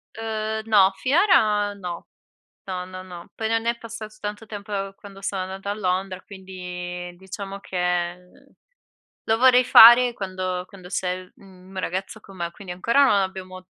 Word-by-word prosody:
Uhm, 220 -1 -3
no. 200 -3 +5
Finora 220 - +3
no. 180 -4 -7 0.6
No, 185 -2 -4
no, 185 0 -9
no. 175 -2 -11
Poi 220 - -2
non 225 0 0
è 235 0 +1
passato 225 -2 -9
tanto 210 +1 -5
tempo, 210 0 -9
uhm, 195 -1 -3
quando 195 -1 -13
sono 195 -1 -2
andata 190 +2 -5
a - - -1
Londra, 190 -2 -2
quindi 180 -2 -7
diciamo 195 +1 -7
che, 180 -2 -1
uhm, 180 0 -23 0.7
lo 220 - +4
vorrei 255 0 +6
fare 240 +1 +9
quando 185 -3 -4
quando 185 -2 -13
c'è 180 0 -2
l 185 - -19
mhmm, 185 -1 -17
mio 190 -1 -5
ragazzo 190 +4 -4
con 195 -2 -15
me, 170 -1 -3
quindi 185 +1 -9
ancora 235 +10 +3
non 265 - +4
abbiamo 185 -1 -5
195 Hz, 170 wpm, -24 LUFS, 185-215 Hz, 0.7 s, fare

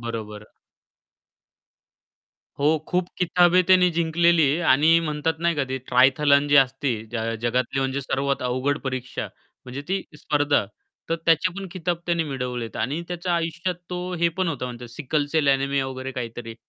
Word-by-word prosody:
बरोबर. 110 -3 -6 2.1
हो, 150 +3 +3
खूप 180 0 0
किताबें 180 0 +4
त्याने 185 -1 +6
जिंकलेली 165 -2 +3
आणि 155 +5 +5
म्हणतात 155 0 -1
नाही 170 0 +1
का, 140 - +1
ते 130 0 -2
ट्रायथलन 140 +3 +4
जी 145 - +5
असती, 135 -1 +3 0.2
ज - - -2 0.3
जगातली 125 +2 0
म्हणजे 135 +1 -1
सर्वात 140 0 -1
अवघड 130 +4 0
परीक्षा 130 -1 -4 0.4
म्हणजे 130 +3 -7
ती 190 0 -1 0.2
स्पर्धा. 145 -4 +1 0.4
तर 165 - 0
त्याचे 165 +2 +3
पण 195 - -5
खिताब 175 -2 -2
त्याने 170 -1 +1
मिळवलेत 125 -4 -4
आणि 145 +6 -2
त्याच्या 175 0 -2
आयुष्यात 170 +2 -2 0.2
तो 180 0 -3 0.2
हे 170 - +4
पण 185 -2 +1
होता 145 -6 -3
म्हणतात 120 -1 -8
सिकल 145 +4 -2
सेल 155 -3 +2
एनेमिया 140 0 +1
वगैरे 130 0 -6
काहीतरी. 115 -2 -6
145 Hz, 150 wpm, -24 LUFS, 130-170 Hz, 2.1 s, त्याने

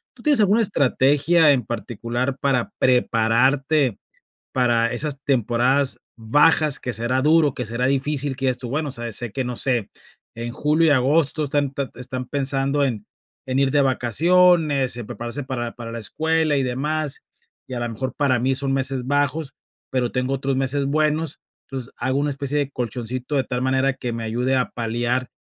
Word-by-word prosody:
¿Tú 245 - -16
tienes 295 -4 +4
alguna 210 +3 +4
estrategia 150 - +3
en 125 -5 +1
particular 120 +3 -3
para 130 -4 0
prepararte 130 +2 +2 0.5
para 120 -2 +2
esas 140 +2 -1
temporadas 130 +2 +1 0.2
bajas 145 +6 +3
que 125 - -4
será 120 +3 0
duro, 155 -1 +3
que 125 -3 -4
será 115 +3 -1
difícil 140 0 0
que 135 - -3
digas 125 - +1
tú: 125 -1 -7
"bueno, 150 +3 -2
sabes, 120 -3 -2
sé 120 -3 -2
que 130 - -2
no 125 -1 -4
sé, 120 -4 0 0.5
en 115 +1 -5
julio 155 +4 +2
y - - +5
agosto 145 +3 +2
están 145 -1 -1
te 140 -1 -3
están 125 0 -4
pensando 140 +1 0
en 115 -7 -2 0.4
en 130 +1 0
ir 135 - +3
de 145 - +3
vacaciones, 145 - +3
en 120 - -6
prepararse 120 +4 -6
para 120 -3 -4
para 115 -1 -8
la 115 - -5
escuela 160 +6 0
y 135 - +1
demás, 145 +4 -2 0.5
y 130 - -6
a - - -3
lo 120 - -2
mejor 130 +3 -4
para 135 -4 +1
mí 130 +2 +1
son 135 0 -1
meses 135 -1 0
bajos, 145 +1 -1 0.4
pero 125 -2 0
tengo 125 +1 -1
otros 135 0 -1
meses 135 +1 0
buenos, 155 +1 0 0.3
entonces 130 -2 -7
hago 130 +2 -1
una 145 0 0
especie 140 +1 -2
de 140 -1 -1
colchoncito 125 +3 -4
de 135 - +2
tal 125 0 -3
manera 130 +1 +1
que 125 -2 -5
me 115 0 -4
ayude 125 +4 0
a 125 -1 0
paliar 120 +2 -1
130 Hz, 180 wpm, -22 LUFS, 125-145 Hz, 0.5 s, y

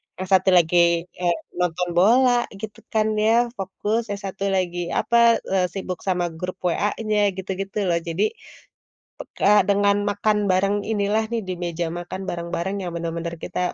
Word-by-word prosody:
yang 185 - -5
satu 190 0 +4
lagi, 175 0 +3 0.3
eee, 175 -1 0 0.2
nonton 180 0 0
bola 245 +8 +5 0.3
gitu 215 -2 -7
kan 215 -1 +2
ya, 230 +3 +3
fokus, 210 +4 -2
yang 200 -1 -5
satu 195 0 -5
lagi 175 -2 -1 0.2
apa, 235 -1 +4
eee, 190 -1 +1
sibuk 185 -1 -5
sama 175 -2 0
grup 180 +1 -4
WA-nya, 210 +4 0 0.2
gitu-gitu 195 +1 -5
loh. 170 -1 +2
Jadi, 170 +6 -1 0.9
pek - - -8
kayak 205 0 +5
dengan 200 0 +3
makan 210 +1 +1
bareng 195 +2 +2 0.2
inilah 210 +1 +1
nih 235 - 0
di 185 - -2
meja 170 0 -2
makan 175 +2 -6
bareng-bareng 170 +2 -3
yang 175 - -4
bener-bener 170 0 -4
kita - - -4
190 Hz, 155 wpm, -23 LUFS, 175-210 Hz, 0.9 s, bola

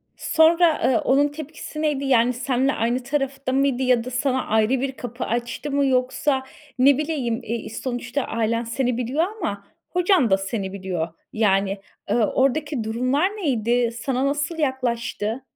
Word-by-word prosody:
Sonra, 330 0 +4
eee, 240 - +3
onun 280 +5 +3
tepkisi 305 +1 -7
neydi? 290 -3 0
Yani, 250 -2 +3
seninle 260 +2 0
aynı 240 +3 0
tarafta 275 0 -2
mıydı 270 -1 +2
ya 250 -2 +3
da 250 - -6
sana 260 +1 0
ayrı 220 0 +2
bir 275 - -1
kapı 245 -1 -6
açtı 240 +5 -3
mı? 280 0 +2
Yoksa 260 +1 +1 0.4
ne 270 +1 +6
bileyim, 280 -7 -1
eee, 230 0 -4
sonuçta 245 +3 -3
ailen 230 +1 -1
seni 240 +1 -1
biliyor 255 +7 0
ama 205 - -3 0.3
hocan 360 - +3
da 190 - +4
seni 195 0 -4
biliyor. 185 -4 -3 0.3
Yani, 195 -2 +1 0.3
eee, - - +2
oradaki 270 +3 +1
durumlar 255 +9 +1
neydi? 245 - 0
Sana 260 +1 0
nasıl 290 +3 -1
yaklaştı? 245 -5 -1
255 Hz, 150 wpm, -23 LUFS, 230-280 Hz, 0.4 s, ne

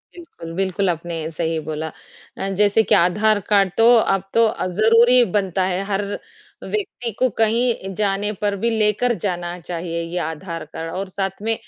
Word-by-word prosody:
बिल्कुल, 330 - -10
बिल्कुल 195 0 0
आपने 170 0 -3 0.2
सही 165 0 -2
बोला। 155 0 -3 0.5
अ, 195 - -3
जैसे 210 +2 +4
कि 215 - +3
आधार 205 +4 +3
कार्ड 195 -2 +3
तो 225 - +5
अब 195 -4 +1
तो 230 0 +5
अ, 220 - -1
ज़रूरी 230 +6 +5
बनता 190 -2 +1
है। 185 +1 -1
हर 195 0 -1 0.6
व्यक्ति 375 - -4
को 255 - +3
कहीं 225 -3 +1
जाने 205 0 0
पर 205 -1 +1
भी 235 - +3
लेकर 215 +3 +2
जाना 175 -2 -3
चाहिए 170 0 -4
ये 170 +1 -5
आधार 165 0 -5
कार्ड 165 0 -5
और 195 +1 -4
साथ 195 0 -4
में 225 +1 0
195 Hz, 170 wpm, -21 LUFS, 175-220 Hz, 0.6 s, तो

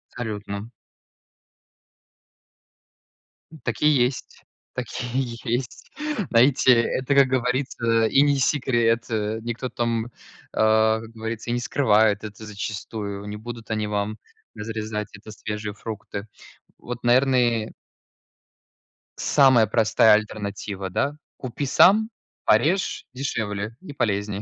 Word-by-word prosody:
Абсолютно. 105 -2 -5 2.9
Так - - -3
и 150 - +5
есть. 130 -3 0 0.3
Так 125 - -3 0.3
и 130 - +1 0.3
есть. 120 +1 -3 0.4
Знаете, 130 +2 +5
это, 130 +4 -1
как 140 -1 +6
говорится, 125 -3 +1
и 135 +5 +4
не 145 0 +4
секрет, 120 -4 +2
э. 110 -1 -1
Никто 120 +2 -4
там, 115 0 -2 0.4
а, 110 0 +3
как 115 - -10
говорится, 115 +1 -5
и - - 0
не 120 - 0
скрывает 110 -5 +2
это 105 +1 -8
зачастую. 105 -1 -5
Не 105 0 -6
будут 115 0 -8
они 110 -1 -1
вам 105 +1 -2 0.4
разрезать 110 -1 -4
это 110 +1 -12
свежие 105 0 -5
фрукты. 105 -1 -7 0.5
Вот, 120 0 -7
наверное 120 -3 +3 1.4
самая 130 -5 +5
простая 110 0 +4
альтернатива, 100 -2 -2
да? 140 +9 0 0.2
Kупи 130 +2 -4
сам, 210 +10 +5 0.4
порежь- 160 - +2
дешевле 110 -5 -3
и 185 - -9
полезнее. 105 -6 -1
115 Hz, 110 wpm, -24 LUFS, 105-125 Hz, 2.9 s, как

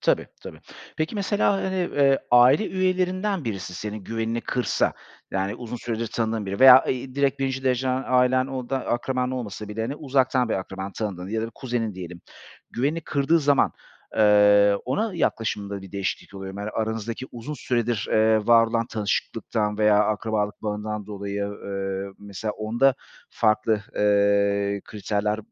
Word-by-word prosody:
Tabii, - - +1 0.2
tabii. - - -10 0.4
Peki 155 +7 -2
mesela, 200 0 +1
hani, 190 -1 -2
eee, 140 -6 +2
aile 125 - +6
üyelerinden 185 -1 0
birisi 95 -5 -4
senin 105 0 -6
güvenini 115 +1 -2
kırsa, 125 - 0 0.4
yani 95 +1 -1
uzun 120 0 -6
süredir 115 -1 -3
tanıdığın 110 -2 -2
biri 100 +5 -4
veya, 130 0 +9
eee, - - +1
i 130 +1 -10
direkt 140 -1 +1
1'inci 135 0 -2
dereceden 130 +1 0
ailen, 130 0 +3
o 130 -2 -5
da 135 - +1
akraban 125 +1 -1
olmasa 105 -5 -5
bile, 105 +2 -5
hani, 135 +6 -3
uzaktan 130 -4 +1
bir - - 0
akraban, 95 +1 -5
tanıdığın 95 -4 -4
ya 110 +1 -2
da - - -2
bir - - -9
kuzenin 120 -5 -3
diyelim. 90 -2 -8 0.5
Güvenini 145 +7 -1
kırdığı 150 +2 +1
zaman, 145 -1 +3 0.4
eee, 105 -1 +5
ona 180 - -1
yaklaşımında 100 - -2
bir 95 - -12
değişiklik 100 0 -4
oluyor 95 0 -7
mu, 100 - -6
hani 105 +1 -4
aranızdaki 110 +3 -3
uzun 125 +6 -6
süredir, 120 -4 -1
eee, 110 -1 +3
var 115 -1 +6
olan 115 0 -1
tanışıklıktan 105 -1 -2
veya 105 -1 +4
akrabalık 105 0 -2
bağından 105 -1 -4
dolayı, 100 -1 -4 0.2
eee, 95 0 -3
mesela 100 +1 -5
onda 120 +5 +2 0.4
farklı, 110 -1 +1 0.2
eee, 100 -1 +2
kriterler, 105 0 -2
110 Hz, 160 wpm, -24 LUFS, 105-130 Hz, 0.5 s, veya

